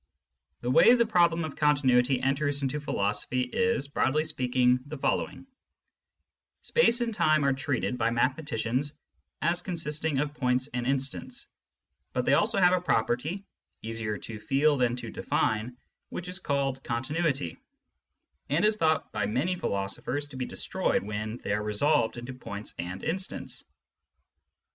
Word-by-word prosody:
The 120 - -1
way 235 - +7
the 235 -1 +3
problem 170 -6 +3
of 155 - -7
con 150 -1 +4
tinuity 130 -1 +3
enters 140 +1 0
into 135 +2 -1
philosophy 105 0 -1
is, 230 - 0
broadly 145 +1 +1
speaking, 125 -4 +2
the 155 +1 -6
following: 135 - -1 1.2
Space 245 - +3
and 235 -1 -1
time 155 -7 +3
are 140 - +3
treated 130 -2 -2
by - - +2
mathematicians 130 +2 0 0.5
as 175 +1 +2
consisting 160 -4 -2
of 145 +1 -1
points 130 -2 +1
and 120 0 -2
instants, 140 - -2 0.7
but - - 0
they - - +4
also - - +3
have 180 -1 +6
a 180 - +2
property, 155 - 0 0.4
easier 110 -2 -3
to 110 0 -7
feel 145 +6 +2
than 125 -3 +1
to 125 - -6
define, 110 +3 -1 0.3
which 180 - -6
is 180 +1 -3
called 140 -4 -1
continuity, 130 - -1 0.9
and 160 +8 +2
is 215 0 +3
thought 160 -4 +1
by 105 -2 -1
many 135 - 0
philosophers 100 - -2
to 140 - -11
be 130 -1 -2
destroyed - - -1
when 105 +2 -4
they - - -1
are 105 - 0
resolved 110 +3 +1
into 120 +2 -6
points 105 -4 -7
and 90 +2 -5
instants. 185 +4 -3
135 Hz, 150 wpm, -28 LUFS, 120-160 Hz, 1.2 s, way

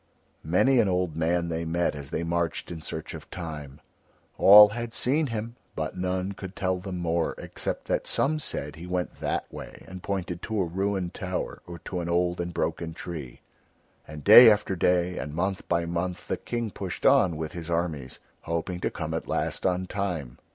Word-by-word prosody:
Many 120 +11 +3
an 105 -4 +3
old 90 -3 0
man 85 +1 +1
they 85 0 -2
met 85 +1 0
as 70 -2 -7
they 80 - -2
marched 85 0 -1
in 80 -2 -6
search 80 0 -5
of - - -9
Time. 75 -5 -7 0.6
All 105 +1 +10
had 115 +2 -5
seen 145 +4 +2
him 115 0 -5 0.2
but 80 0 -3
none 90 +1 -1
could 95 -1 -8
tell 95 -1 0
them 95 0 -5
more, 85 -1 0
except - - -4
that - - -1
some 155 +2 +1
said 75 - -4
he 85 +2 -8
went 90 0 -3
that - - -1
way - - -9
and 95 -1 -9
pointed 90 -3 -3
to 110 -1 -2
a 95 - +2
ruined 95 +1 -2
tower 90 -1 -4
or 85 0 -7
to 90 - -3
an 85 0 -3
old 90 0 +1
and 85 0 -3
broken 80 -1 -2
tree. 75 -10 -7 0.7
And 75 -1 -9
day 115 +3 +11
after 105 -3 +2
day 90 0 +1
and 75 +1 -5
month 95 +3 -2
by 85 -1 +1
month 85 +1 -3
the - - -1
King 120 -3 -3
pushed - - -6
on 85 -4 +5
with 80 -1 -4
his 85 -1 -7
armies, 80 -6 -2 0.3
hoping 85 +2 -2
to - - 0
come 80 -1 -5
at 80 - -3
last - - -1
on 90 0 0
Time. 90 -11 -3
90 Hz, 195 wpm, -27 LUFS, 80-95 Hz, 0.7 s, day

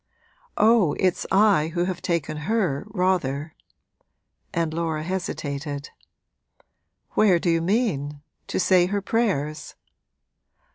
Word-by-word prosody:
'Oh, 215 -8 +4
it's 185 -2 +1
I 195 -6 +4
who 175 - +1
have 180 -1 -3
taken 165 -3 -1
her, 190 -11 0
rather.' 175 -7 -1 1.0
And 165 -2 -1
Laura 160 -2 -2
hesitated. 145 -5 -4 1.2
'Where 195 -5 +4
do 170 0 0
you 165 0 +2
mean? 165 - -1 0.2
to - - -2
say 180 -1 +4
her 200 +1 -2
prayers?' 180 -11 -1
175 Hz, 105 wpm, -24 LUFS, 150-195 Hz, 1.2 s, Oh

